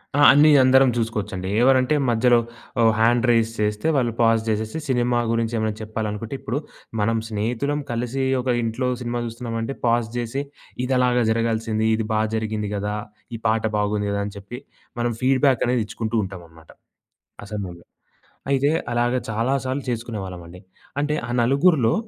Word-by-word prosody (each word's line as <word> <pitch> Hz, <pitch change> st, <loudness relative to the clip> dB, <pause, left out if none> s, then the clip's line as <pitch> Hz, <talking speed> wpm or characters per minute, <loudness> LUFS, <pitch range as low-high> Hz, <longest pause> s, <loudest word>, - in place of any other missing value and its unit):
ఆ! -, -, +2 dB
అన్నీ 150 Hz, +2 st, +6 dB
అందరం 130 Hz, 0 st, +5 dB
చూసుకోవచ్చండి. 105 Hz, -5 st, -3 dB
ఎవరంటే 130 Hz, +2 st, +4 dB
మధ్యలో 120 Hz, +1 st, +4 dB, 0.4 s
ఆహ్, 115 Hz, -1 st, +5 dB
హ్యాండ్ 120 Hz, +2 st, +3 dB
రైజ్ 115 Hz, -1 st, +3 dB
చేస్తే 105 Hz, +6 st, 0 dB
వాళ్ళు 120 Hz, -3 st, +1 dB
పాజ్ 115 Hz, -1 st, +4 dB
చేసేసి, 110 Hz, +5 st, -2 dB
సినిమా 120 Hz, -2 st, +1 dB
గురించి 115 Hz, 0 st, 0 dB
ఏమైనా 110 Hz, -1 st, 0 dB
చెప్పాలనుకుంటే 110 Hz, +2 st, -4 dB
ఇప్పుడు 130 Hz, +6 st, -3 dB, 0.4 s
మనం 115 Hz, +2 st, +1 dB
స్నేహితులం 120 Hz, +7 st, -1 dB
కలిసి 125 Hz, +3 st, -2 dB, 0.2 s
ఒక 130 Hz, -, -8 dB, 0.2 s
ఇంట్లో 115 Hz, +3 st, -1 dB
సినిమా 120 Hz, 0 st, -2 dB
చూస్తున్నామంటే, 115 Hz, +2 st, -4 dB
పాజ్ 115 Hz, -1 st, +2 dB
జేసి, 120 Hz, +4 st, -2 dB, 0.4 s
ఇదలాగా 125 Hz, -2 st, +2 dB
జరగాల్సింది. 115 Hz, -1 st, 0 dB
ఇది 110 Hz, -1 st, -2 dB
బా 110 Hz, -, +2 dB
జరిగింది 110 Hz, -2 st, -2 dB
గదా! 105 Hz, +1 st, -2 dB, 0.4 s
ఈ 115 Hz, -, -7 dB
పాట 110 Hz, 0 st, +1 dB
బాగుంది 105 Hz, 0 st, 0 dB
గదా! 100 Hz, 0 st, -1 dB
అని 100 Hz, -, -6 dB
చెప్పి 100 Hz, +6 st, -8 dB, 0.4 s
మనం 120 Hz, 0 st, 0 dB
ఫీడ్‌బాకనేది 130 Hz, -2 st, +2 dB
ఇచ్చుకుంటూ 115 Hz, +1 st, -4 dB
ఉంటంనమాట, 85 Hz, -4 st, -12 dB, 0.7 s
ఆ -, -, -9 dB
సమయంలో. 90 Hz, -5 st, -6 dB, 0.6 s
అయితే 140 Hz, +1 st, +2 dB, 0.2 s
అలాగ 120 Hz, +1 st, +1 dB
చాలా 115 Hz, +4 st, 0 dB
సార్లు 130 Hz, +1 st, -2 dB
చేసుకునేవాళ్ళమండి. 95 Hz, -7 st, -5 dB, 0.4 s
అంటే 150 Hz, +1 st, 0 dB
ఆ -, -, -8 dB
నలుగురిలో 135 Hz, -2 st, +3 dB
115 Hz, 145 wpm, -23 LUFS, 110-125 Hz, 0.7 s, అన్నీ